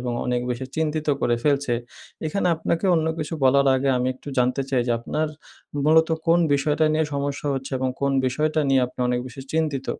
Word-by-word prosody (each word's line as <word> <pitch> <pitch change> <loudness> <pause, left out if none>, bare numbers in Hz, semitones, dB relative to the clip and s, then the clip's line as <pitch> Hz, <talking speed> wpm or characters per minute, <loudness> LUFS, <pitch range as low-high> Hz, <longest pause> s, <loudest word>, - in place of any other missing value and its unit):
এবং 125 -1 -3
অনেক 125 0 0
বেশি 125 +2 -3
চিন্তিত 155 -1 -1
করে 120 - +2
ফেলছে। 140 -3 +1 0.5
এখানে 180 +4 -1
আপনাকে 165 +3 -1
অন্য 160 -1 +1
কিছু 155 +1 -3
বলার 140 +1 +4
আগে 135 +1 0
আমি 125 +1 0
একটু 135 - -12
জানতে 125 +2 +2
চাই 130 -2 +2
যে 120 - +2
আপনার 155 +6 -2 0.6
মূলত 160 +1 +5 0.2
কোন 170 +1 +5 0.2
বিষয়টা 150 +2 +1
নিয়ে 155 0 +2
সমস্যা 140 +1 -3
হচ্ছে 135 +1 -5
এবং 130 0 0
কোন 140 0 +1
বিষয়টা 155 +4 0
নিয়ে 135 -1 +4
আপনি 125 - -17
অনেক 125 0 0
বেশি 130 +2 -9
চিন্তিত? 150 -4 -1
140 Hz, 190 wpm, -23 LUFS, 130-155 Hz, 0.6 s, মূলত